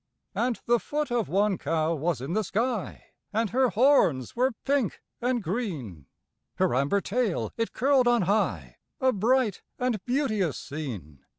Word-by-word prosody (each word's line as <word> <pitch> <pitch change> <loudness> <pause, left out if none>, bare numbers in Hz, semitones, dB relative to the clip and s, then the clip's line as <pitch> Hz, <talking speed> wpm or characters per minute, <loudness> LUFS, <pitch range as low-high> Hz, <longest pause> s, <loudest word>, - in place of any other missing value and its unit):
And 240 0 0
the 240 0 +3
foot 295 +1 -3
of 240 -3 0
one 200 0 +2
cow 160 +2 0
was 160 -3 -1
in 140 +6 -4
the 215 +2 +1
sky, 225 +1 -2 0.2
And 220 -1 0
her 255 +2 +3
horns 210 - +3
were 255 +2 +2
pink 275 -6 +1 0.2
and 245 -2 0
green; 155 - -4 0.5
Her - - +1
amber 140 +10 +2
tail 225 -3 -1
it 230 0 -2
curled 265 0 +3
on 240 -4 +4
high 155 - 0 0.2
A 260 -1 +3
bright 230 0 +1 0.2
and 245 -6 -1
beauteous 220 - 0
scene. 115 - -7
210 Hz, 155 wpm, -27 LUFS, 160-245 Hz, 0.5 s, on